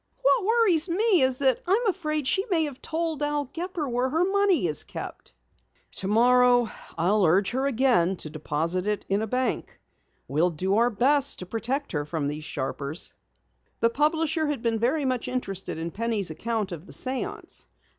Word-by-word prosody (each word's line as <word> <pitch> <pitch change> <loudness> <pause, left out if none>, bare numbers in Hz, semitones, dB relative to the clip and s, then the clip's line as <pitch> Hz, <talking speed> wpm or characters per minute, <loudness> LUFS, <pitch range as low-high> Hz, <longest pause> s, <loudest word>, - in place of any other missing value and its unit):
"What - - +3
worries 400 -7 +4
me 390 0 +3
is 260 -1 +2
that 265 -3 +2
I 370 - +3
am 465 +3 +2
afraid 310 -7 -1
she 385 - +2
may 335 -4 +2
have 285 -4 -5
told 320 -2 -2
Al 295 0 0
Gepper 330 +3 -4
where 250 +1 0
the 325 +6 +2
money 390 - +2
is 155 -3 +2
kept." - - -9 0.6
"Tomorrow 245 +3 +3 0.3
I'll 195 +5 +2
urge 185 +4 +3
her 265 +3 0
again 235 -9 +2
to 155 -4 -5
deposit 165 +4 -1
it 210 -1 -1
in 200 +2 +1
a 220 - -2
bank. 255 +3 -2 0.5
We'll 160 +5 +2
do 185 +5 -1
our 235 +1 +4
best 275 +5 +2
to 180 - -6
protect 245 +8 -3
her 150 -3 -1
from 150 -1 -3
these 150 +1 -4
sharpers." 140 +3 -3 0.7
The 230 - +3
publisher 310 +3 +1
had 290 -5 -3
been 225 -1 0
very 270 +6 +1
much 255 -2 -1
interested 195 -10 -3
in 165 +1 -4
Penny's 220 -5 -1
account 220 +3 -3
of 170 +2 -8
the - - -9
séance. 260 0 -3
250 Hz, 175 wpm, -26 LUFS, 195-305 Hz, 0.7 s, worries